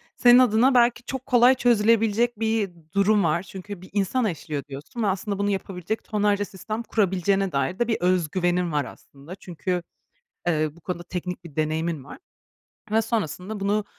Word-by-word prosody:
senin 245 0 +7
adına 250 +2 +4
belki 240 0 +3
çok 265 0 -5
kolay 250 0 +5
çözülebilecek 230 -1 +2
bir 220 -3 0 0.2
durum 200 0 +3
var. 170 +2 +1
Çünkü 190 +1 -9
bir 185 - -13
insan 210 +5 +1
eşliyor 155 -6 -3
diyorsun 145 - -6
ve - - +2
aslında 195 +1 -2
bunu 200 0 +1
yapabilecek 195 +1 -3
tonlarca 205 -1 +1
sistem 215 +4 -6
kurabileceğine 195 -2 +1
dair 140 - -1
de 240 - +1
bir 225 - +1
öz 180 -3 +2
güvenin 175 -1 0
var 145 -3 0
aslında. 140 +9 -12
Çünkü, 180 -1 -4 0.6
eee, 155 -3 +2
bu 170 - -17
konuda 175 0 -5
teknik 180 0 -5
bir 155 -4 -12
deneyimin 155 -1 -1
var - - -11 0.7
ve 220 +1 +3
sonrasında 215 -2 -3
bunu 205 +1 0
195 Hz, 165 wpm, -24 LUFS, 175-220 Hz, 0.7 s, senin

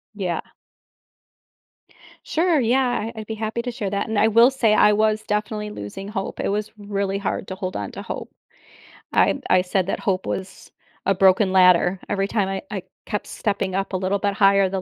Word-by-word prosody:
Yeah. 180 -5 -2 1.8
Sure, 330 -1 +2
yeah. 255 +2 +2 0.3
I 220 - -9
I'd - - -9
be 220 - -4
happy 220 +2 -3
to 245 - -3
share 225 -5 -3
that. 200 +2 -2
And 220 -2 0
I 220 - +5
will 230 +4 +6
say 240 -5 +2
I 210 0 +5
was 215 +1 +1
definitely 210 0 -2
losing 195 - -7
hope; 195 -2 -4
it - - -1
was 210 +1 -2
really 200 -1 -2
hard 200 -1 -3
to 190 - -5
hold 185 -1 -5
on 100 -1 -4
to - - -7
hope. - - -6 0.8
I - - +3
I 185 - +4
said 185 0 0
that 195 - -2
hope 190 -4 -1
was 190 0 -6 0.3
a 195 - +3
broken 190 +1 +4
ladder; 180 0 +5
every 195 -1 0
time 200 -2 0
I 195 0 -3
I 195 -3 -4 0.2
kept 210 -2 -3
stepping 200 -3 -2
up 195 +1 -2
a - - +1
little 190 +2 0
bit 200 0 -1
higher, 195 -1 +4
the 190 +1 -3
200 Hz, 200 wpm, -22 LUFS, 190-215 Hz, 1.8 s, will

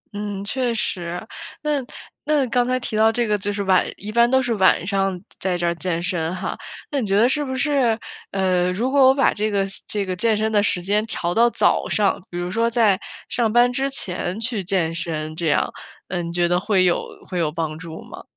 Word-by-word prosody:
嗯， 205 -1 -4
确 240 +2 -1
实， 175 -1 -3 0.4
那 295 -3 0 0.4
那 295 -3 +2
刚 245 +1 +3
才 255 0 +1
提 220 - -5
到 220 +1 +5
这 240 +1 0
个 210 -1 +1
就 205 +1 -2
是 200 0 -2
晚 190 -1 +4
一 210 +2 -6
般 235 +1 +4
都 265 0 +4
是 240 -1 0
晚 190 -3 +3
上 195 -2 0 0.2
在 180 -2 -1
这 175 - -2
儿 170 - +2
健 170 -1 -3
身 175 -1 -2
哈。 185 +1 -4 0.4
那 280 -3 0
你 215 - -2
觉 195 +1 +2
得 230 +3 +5
是 295 +3 0
不 260 -1 -4
是， 255 -4 +2 0.3
呃， 185 -2 +1
如 245 +7 -1
果 275 -2 +6
我 265 - +5
把 275 - +3
这 215 +1 -1
个 200 -1 +1 0.2
这 205 -2 -2
个 185 -1 -3
健 220 +3 +2
身 220 +1 0
的 205 -1 +3
时 180 -3 0
间 205 +3 +1
调 175 -4 -2
到 235 +1 +4
早 - - +1
上， 205 -4 +1
比 175 - -6
如 175 +1 -3
说 230 +2 +1
在 225 -5 +3 0.3
上 230 -3 0
班 245 +1 +4
之 270 +2 0
前 185 -5 -1
去 225 -4 -2
健 175 -3 0
身 155 -2 -3
这 165 -1 -2
样， 150 - +1 0.4
呃， 180 -1 -2
你 170 0 -5
觉 175 0 +1
得 175 +1 +2
会 195 -2 +2
有 175 - +1 0.2
会 180 -2 -3
有 155 -2 +1
帮 160 -1 -3
助 165 -2 -8
吗？ - - -11
200 Hz, 245 characters per minute, -22 LUFS, 180-235 Hz, 0.4 s, 果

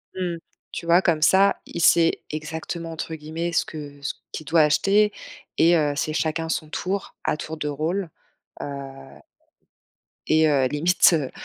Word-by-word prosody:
Mmh, 175 -2 -2 0.3
tu - - -6
vois 170 +2 +5
comme 165 -4 +1
ça, 195 +5 +4
il 170 - -5
sait 165 0 +4
exactement, 160 +2 -5
entre 160 0 -5
guillemets, 160 +3 -4
ce - - +1
que 145 -2 -9
ce 140 - -3 0.2
qu'il 155 - -7
doit 165 +2 +4
acheter 200 +8 +3 0.5
et 170 +2 +5
heu, 150 -3 +1
c'est 155 +1 -2
chacun 160 +1 -1
son 155 -1 -2
tour, 190 +5 -4
à - - 0
tour 160 +1 -6
de 150 -1 -3
rôle, 160 +5 -2 0.5
heu 135 -1 -8 1.1
et 155 0 +4
heu, 135 -3 +3
limite, 170 +6 +4
heu, 145 -5 -1
160 Hz, 160 wpm, -23 LUFS, 150-170 Hz, 1.1 s, vois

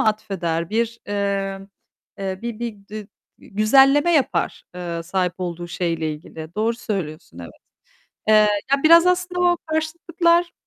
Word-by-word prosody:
atfeder, 180 -6 -1
bir, 230 +1 -1
eee, 200 -1 -1 0.6
eee, 190 -1 -3
bir 235 -2 -5
bir 215 -4 -6
dü 215 -1 -7 0.4
e 195 - -16
düzenleme 275 +9 +5
yapar, 285 -5 0
eee, 170 -2 -4
sahip 180 +1 -1
olduğu 175 -1 -5
şeyle 165 -3 -2
ilgili. 160 +2 -10
Doğru 225 +2 0
söylüyorsun 160 - -5
evet. 85 -1 -8 0.8
Eee, 215 - +5 0.4
ya, 275 0 +2
biraz 335 +2 +7
aslında 360 0 0
o 350 -1 +3
karşıtlıklar 340 +2 +1
210 Hz, 135 wpm, -22 LUFS, 175-290 Hz, 0.8 s, biraz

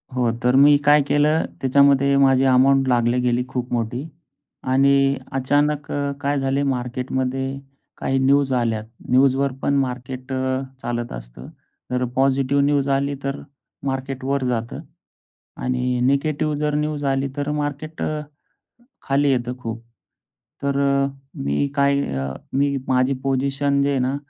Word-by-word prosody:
हो. 120 -2 +1
तर 125 +1 +3
मी 145 +2 +7
काय 150 0 +6
केलं, 150 +2 +2 0.2
त्याच्यामध्ये 140 +1 +4
माझी 135 -1 +4
अमाउंट 135 +1 +4
लागली 120 0 +2
गेली 125 0 +1
खूप 125 -1 -4
मोठी. 120 +5 -2 0.6
आणि 140 +1 +3
अचानक 145 +2 0
अ, 140 0 -1
काय 145 -1 0
झाले 135 +1 0
मार्केटमध्ये 130 +2 -3 0.4
काही 135 0 0
न्यूज 135 +1 +3
आल्या. 115 -3 0 0.3
न्यूजवर 135 +1 +3
पण 140 - +1
मार्केट 130 0 -4 0.5
चालत 120 0 -3
असतं. - - -10 0.4
जर 125 0 0
पॉझिटिव्ह 135 +1 +2
न्यूज 140 -1 +1
आली 140 +1 0
तर 140 0 -3 0.4
मार्केट 135 -1 -3
वर 140 0 0
जातं 120 0 -2 0.8
आणि 125 0 0
निगेटीव 145 +4 +1
जर 150 -1 0
न्यूज 150 -1 -2
आली 135 +1 0
तर 145 +1 -1
मार्केट 150 +1 -4
अ, 155 0 -2 0.8
खाली 140 +1 +1
येतं 125 -1 -1
खूप. 115 -2 -6 0.8
तर 140 0 0 0.7
मी 70 - 0
काय 140 0 +2 0.2
अ, 65 0 -2 0.2
मी 140 +1 +1
माझी 130 +1 +2
पोझिशन 140 +1 0
जे 140 - +1
आहे 140 - 0
ना, 130 +2 0
135 Hz, 135 wpm, -21 LUFS, 125-140 Hz, 0.8 s, मी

